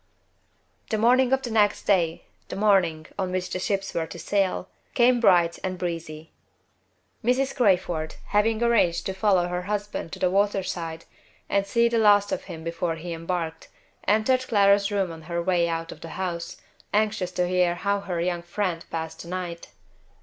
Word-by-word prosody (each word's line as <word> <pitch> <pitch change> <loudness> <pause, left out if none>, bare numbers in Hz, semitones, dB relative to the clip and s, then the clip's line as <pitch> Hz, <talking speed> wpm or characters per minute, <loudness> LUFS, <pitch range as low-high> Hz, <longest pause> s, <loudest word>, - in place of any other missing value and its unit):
The 220 - 0
morning 250 +3 +4
of 265 0 +2
the 240 - -4
next 210 -2 +2
day 170 -5 +1 0.3
the - - -5
morning 190 -6 +2
on 185 -1 -1
which 185 0 -2
the 185 - -2
ships 195 +1 -2
were 165 -1 -1
to - - -9
sail 185 +1 0 0.3
came 245 0 +4
bright 175 -6 +4
and 185 -1 -2
breezy. 165 -3 -5 0.9
Mrs. 265 +3 +1
Crayford, 180 - +1
having 220 +2 +2
arranged 210 -8 +2
to 190 - -2
follow 190 -2 +2
her 180 0 -2
husband 205 -3 -4
to - - -5
the 180 - +1
water 200 0 +2
side, 165 -3 -5 0.4
and 200 0 +1
see 235 +3 +3
the 235 -1 +1
last 205 -2 +5
of - - -3
him 165 -4 -8
before 165 0 -2
he 170 +1 -6
embarked, 165 -1 -4 0.4
entered 255 +5 +2
Clara's 200 -2 +4
room 195 -4 0
on 165 0 -9
her 170 0 -1
way 170 -1 +1
out 165 0 -3
of - - -11
the 165 - -8
house, 175 -3 -4 0.3
anxious 210 -3 0
to 180 0 0
hear 180 -1 +2
how 200 +3 0
her 185 -3 -4
young 175 0 -1
friend 175 -1 -3
passed 160 0 -5
the - - -11
night. 175 -1 -5
185 Hz, 180 wpm, -25 LUFS, 170-205 Hz, 0.9 s, last